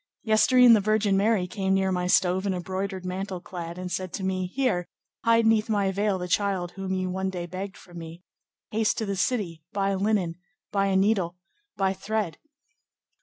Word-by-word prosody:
"Yestere'en 240 +2 +6
the 220 - +6
Virgin 210 -1 +2
Mary 200 -1 +2
came 190 +1 0
near 190 0 +1
my 180 -1 0
stove, 185 +2 +3
in 190 - 0
a - - -3
broidered 190 +1 -4
mantle 185 +1 -4
clad, 175 -1 -7
and 180 0 -5
said 185 -1 -3
to 195 - -4
me, 185 -1 -1
'Here, 190 -5 0 0.4
hide 230 0 +4
'neath 220 0 +3
my 200 -3 +2
veil 200 0 0
the 180 -1 -4
child 185 -2 0
whom 190 0 -3
you 185 0 -1
one 190 +1 -1
day 180 -2 -4
begged 190 +3 -6
from 175 -1 -11
me. 165 +2 -10 0.5
Haste 220 0 +1
to 220 - -1
the 200 -1 -2
city, 190 -6 -1
buy 200 -1 +1
linen, 195 -4 0 0.3
buy 200 -1 +2
a 195 - +1
needle, 190 -3 +2 0.4
buy 195 -1 +2
thread. 195 -2 -3
190 Hz, 190 wpm, -26 LUFS, 180-205 Hz, 0.5 s, Yestere'en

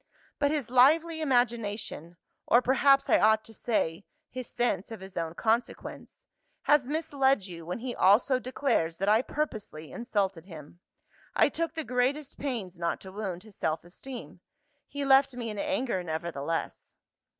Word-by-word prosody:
But 285 - +3
his 285 -6 -2
lively 315 +6 +4
imagination 230 - -1 0.3
(or 240 - +6
perhaps 270 +2 +4
I - - +5
ought 220 0 +4
to 225 - -12
say, 200 -6 -1 0.3
his 255 -1 -6
sense 230 -6 -1
of 225 - -7
his 190 0 -11
own 165 0 -3
consequence) 225 +5 -2 0.4
has 290 -3 +4
misled 275 - +1
you 170 -3 -9
when 180 - -3
he 245 +1 -4
also 240 +7 +4
declares 250 - 0
that 195 - -2
I 215 +2 +5
purposely 215 - -4
insulted 200 -8 -2
him. 160 -1 -11 0.6
I - - +5
took 330 -1 -3
the 320 - -2
greatest 265 +3 -1
pains 215 -11 -4
not 170 0 -1
to 190 - -9
wound 190 -3 -5
his 215 -3 -15
self 160 0 -1
esteem. 185 - -9 0.5
He 285 0 -4
left 270 -1 +5
me 235 -3 -4
in 210 - -6
anger, 265 -9 -1
nevertheless. 165 -2 -4
230 Hz, 155 wpm, -29 LUFS, 185-270 Hz, 0.6 s, or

